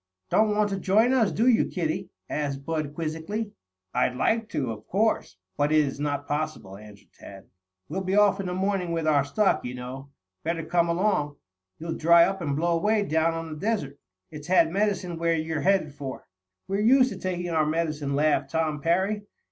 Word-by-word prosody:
"Don't 215 -1 +3
want 210 -1 +1
to 195 - -2
join 220 +7 +3
us, 230 -6 +3
do 225 - +1
you, 250 -3 +5
kiddie?" 160 -4 -3 0.2
asked 140 -2 -3
Bud 155 -3 -3
quizzically. 165 +7 -3 0.4
"I'd 125 0 +1
like 225 - 0
to, 130 -5 -2
of 110 -1 -9
course. 205 - 0 0.2
But 145 +1 +1
it 155 - +4
is 135 0 -5
not 145 -1 -2
possible," 150 -10 -3
answered 105 -1 -14
Tad. 95 -1 -12 0.4
"We'll 190 +6 -3
be 190 +1 -1
off 205 -1 +4
in 195 - -3
the 180 - -3
morning 190 -2 -1
with 165 -1 -1
our 145 -3 +3
stock, 195 +9 +1
you 125 0 -5
know. 130 +2 -8 0.3
Better 165 0 -2
come 170 +1 +1
along. 170 -5 0 0.4
You'll 165 0 -4
dry 170 +1 +6
up 195 -1 -3
and 145 -4 -1
blow 170 +3 +1
away 210 +3 +2
down 160 -1 +1
on 165 -1 -5
the 155 - -9
desert. 175 -10 -2 0.3
It's 150 -1 -9
had 175 -3 +4
medicine 190 -3 -1
where 170 0 +2
you're 160 -1 -2
headed 185 -4 +2
for." 140 -2 -7 0.4
"We're 195 +1 -1
used 255 +3 +5
to - - -7
taking 175 -1 -3
our 155 -2 +2
medicine," 155 -3 -1
laughed 145 -2 +2
Tom 155 -1 -1
Parry. 190 +6 0
165 Hz, 195 wpm, -26 LUFS, 145-195 Hz, 0.4 s, dry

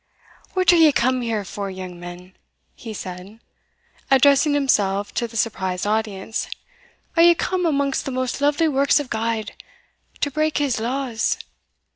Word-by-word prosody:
"What 370 -1 +5
are - - +5
ye 320 -2 +7
come 255 -1 +1
here 225 -4 -2
for, 200 +1 -5
young 185 -2 -8
men?" 175 +1 -10 0.4
he 225 - -9
said, 190 +1 -8 0.7
addressing 280 +2 +5
himself 205 -8 +1
to 235 - -1
the 230 0 -8
surprised 190 -4 -1
audience; 215 0 -2 0.7
"are 335 - +5
ye 345 0 +7
come 360 +1 -1
amongst 280 -3 0
the 270 - -3
most 255 +1 -2
lovely 290 +3 +2
works 280 0 +3
of 285 -3 -6
God 220 -1 -2 0.7
to 285 - 0
break 310 +2 0
his 280 -6 0
laws? 245 0 -1
235 Hz, 150 wpm, -22 LUFS, 205-285 Hz, 0.7 s, ye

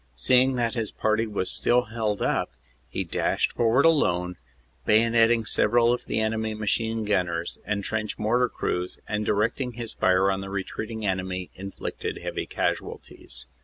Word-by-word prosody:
Seeing 130 - +3
that 120 -2 0
his 115 -4 -2
party 110 +1 0
was 100 -3 0
still 125 0 +3
held 110 -2 -2
up, - - 0 0.4
he - - -2
dashed - - 0
forward 120 +5 +3
alone, 90 - +2 0.5
bayonetting 115 - +4
several 120 +3 +4
of 125 - -4
the - - -1
enemy 110 0 -1
machine 110 +1 -1
gunners 90 -4 -1
and 105 -1 -1
trench 110 0 -2
mortar 120 +3 +2
crews 90 -4 -3
and, 105 0 -2
directing 115 +4 0
his 115 -1 -5
fire 95 +1 +3
on 95 0 -2
the 95 - -6
retreating 110 +3 -4
enemy, 95 -1 -2
inflicted 95 +1 -5
heavy - - -4
casualties. - - -4
110 Hz, 150 wpm, -26 LUFS, 95-115 Hz, 0.5 s, bayonetting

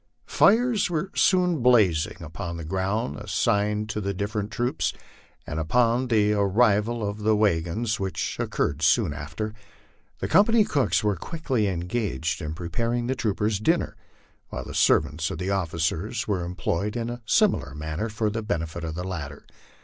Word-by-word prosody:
Fires 230 0 +3
were 175 +3 -2
soon 180 -5 +3
blazing 105 -11 +3
upon 85 +1 -6
the 85 - -6
grounds 95 -2 -2
assigned 105 +1 0
to 105 - -2
the 100 0 -2
different 105 +1 -2
troops, 120 +4 -1 0.5
and 75 - -4
upon 120 +9 +2
the 105 -3 +3
arrival 105 +2 +2
of 100 +1 -4
the 110 +1 +2
wag 95 -6 +2
ons, 110 +5 -2
which 95 -1 -2
occurred 75 +1 -1
soon 80 +1 +3
after, 80 +9 -5 0.6
the - - -3
company 210 +5 +5
cooks 145 - +1
were 105 -2 +2
quickly 130 - -2
engaged 90 -2 -2
in 75 0 -4
preparing 115 +9 -2
the 130 - 0
troopers' 105 -3 -1
dkmer, 165 +10 +1 0.6
while - - -5
the - - -8
servants 80 +1 +2
of - - -5
the 95 +1 -2
officers 95 +5 -1
were 95 -4 0
employed 90 +4 -2
in 120 0 -2
a 120 0 -7
similar 185 - +2
manner 80 +8 -3
for 105 0 -1
the 115 +2 -3
benefit 85 -5 -3
of 80 -1 -4
the 90 - -4
latter. 80 -7 -6
105 Hz, 160 wpm, -25 LUFS, 85-120 Hz, 0.6 s, company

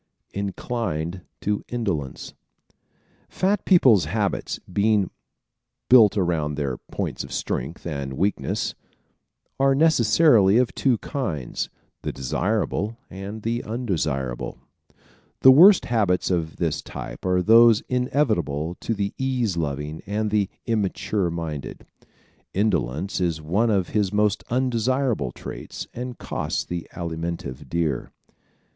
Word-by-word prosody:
Inclined 95 -4 -3 0.2
to 105 0 -1
Indolence 95 - -3 0.4
¶ - - -35 0.6
Fat 195 +2 0
people's 130 - +5
habits, - - -2
being 100 +1 +1 0.8
built 110 -5 +7
around 80 -6 0
their 70 -4 -2
points - - -4
of 70 - -10
strength 65 +4 -3
and 70 -5 -4
weakness, 100 +9 -1 0.9
are 135 0 +4
necessarily 120 -7 +5
of 125 -1 +2
two 130 -4 +2
kinds 90 - -3 0.3
the - - -3
desirable 105 - -1
and 100 +3 -7
the 115 +1 -1
undesirable. 80 - -2 0.8
The 130 - +9
worst 180 +8 +8
habits 100 -6 +1
of 80 -3 -1
this 80 -4 -1
type - - -8
are 90 -1 +2
those 115 0 +7
inevitable 105 - 0
to 115 - -2
the 100 -1 -2
ease 125 -7 0
loving 75 -1 -3
and 105 +1 -1
the 105 -2 +1 0.2
immature 105 -3 0
minded. 80 -6 -5 0.7
Indolence 95 - 0
is 85 -3 0
one 95 +10 +1
of 95 -5 +1
his 105 -3 0
most 105 0 +1
undesirable 125 - 0
traits - - -7
and 125 0 -6
costs - - -3
the 85 -1 -5
Alimentive 85 -5 -5
dear. 80 -6 -1
100 Hz, 115 wpm, -24 LUFS, 80-115 Hz, 0.9 s, The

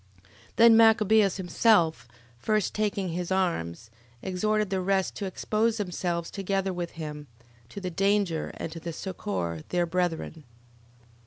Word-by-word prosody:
11:7. - - -26 0.3
Then 230 0 +7
Machabeus 220 -3 +5
himself 175 - +2 0.3
first 215 - 0
taking 205 -3 -1
his 175 +2 -4
arms, 115 - -1 0.3
exhorted 210 +2 0
the 190 -1 0
rest 190 0 0
to 205 - -3
expose 215 +4 0
themselves 175 -4 -3
together 195 -1 -1
with 175 -1 -5
him, 150 -2 -7 0.4
to 200 - -7
the 185 -2 -4
danger, 195 -2 0
and 165 - -5
to 165 +1 -6
succour 95 - -4
their 175 -1 +1
brethren. 165 -2 -2
185 Hz, 135 wpm, -27 LUFS, 165-205 Hz, 0.4 s, Then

